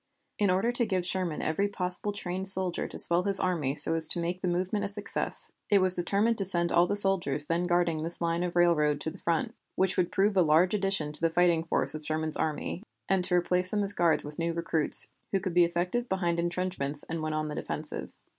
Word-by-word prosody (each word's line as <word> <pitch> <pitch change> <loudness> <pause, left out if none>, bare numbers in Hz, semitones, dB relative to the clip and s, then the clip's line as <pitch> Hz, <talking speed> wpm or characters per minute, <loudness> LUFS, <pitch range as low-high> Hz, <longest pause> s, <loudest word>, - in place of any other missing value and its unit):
In 205 -2 +1
order 190 +6 0
to 245 0 -1
give 185 -3 -2
Sherman 180 -3 -3
every 160 +6 -1
possible 185 0 0
trained 190 -1 -5
soldier 190 -2 +6
to - - -10
swell 170 +1 +5
his 195 0 +4
army 155 -7 -2
so 165 - +2
as 160 -1 +5
to 175 - +3
make 175 +2 -4
the - - -3
movement 185 +4 -2
a - - -2
success, 205 +1 -3 0.2
it 205 - +3
was 185 -1 +6
determined 205 +6 0
to - - -1
send 175 -2 +2
all 175 +1 +2
the 205 - -2
soldiers 180 -8 +5
then 170 +3 -2
guarding 175 -3 -1
this 165 +2 -5
line 170 0 -2
of 175 -1 -4
railroad 150 -4 +1
to 160 - -4
the 185 - -14
front, 230 +8 -2 0.2
which 190 0 -1
would 175 - -1
prove 200 +1 0
a 185 - +3
large 165 +3 +2
addition 195 -7 -1
to 150 - 0
the 165 - +1
fighting 170 -1 +1
force 165 - 0
of 155 0 -8
Sherman's 155 0 -1
army, 160 +3 -4 0.3
and 190 -1 0
to 180 - -1
replace 180 +1 0
them 205 0 -2
as 200 +1 +4
guards 170 -6 0
with 150 +2 -4
new 165 0 -2
recruits, 165 -2 +1 0.2
who 195 - 0
could 185 -2 -5
be 175 0 +4
effective 180 +8 -3
behind 175 -3 -2
intrenchments 170 -5 -4
and 165 0 -6
when 155 0 -4
on 155 0 -3
the - - -6
defensive. 150 - -6
175 Hz, 230 wpm, -27 LUFS, 165-190 Hz, 0.3 s, soldier